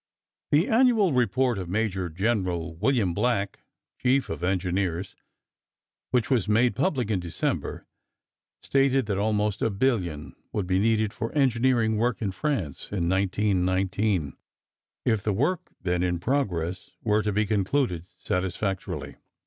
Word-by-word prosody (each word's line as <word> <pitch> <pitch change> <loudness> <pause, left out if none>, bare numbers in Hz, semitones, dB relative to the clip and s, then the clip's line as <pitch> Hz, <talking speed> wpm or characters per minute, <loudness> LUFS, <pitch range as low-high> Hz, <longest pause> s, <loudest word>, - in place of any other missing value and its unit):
The 155 +6 +3
annual 225 - +4
report 125 -1 +2
of 90 -2 -5
Major 95 -3 -1
General 90 -3 -1
William 110 -3 +2
Black, 105 0 0 0.4
chief 130 +2 +2
of - - -5
engineers, 90 0 -1 0.9
which 125 +1 +1
was 115 -7 +2
made 115 +3 +3
public 130 - 0
in 100 - +1
December, 85 -2 -3 0.8
stated 135 -2 +2
that 100 -2 -1
almost 105 -1 0
a - - +2
billion 95 - -1 0.2
would 105 - -1
be 95 +1 +1
needed 110 0 +2
for 115 0 -4
engineering 120 -5 +2
work 115 -1 +1
in 100 -4 -1
France 95 - -2
in 90 -4 -1
1919, 95 - +1 0.7
if 110 -4 +2
the 105 +1 0
work 160 - 0
then 90 -1 -1
in 90 -1 +1
progress 90 - -1
were 105 -1 +2
to 105 - -1
be 105 +1 +1
concluded 100 - 0
satisfactorily. 95 +1 -3
105 Hz, 135 wpm, -26 LUFS, 95-125 Hz, 0.9 s, annual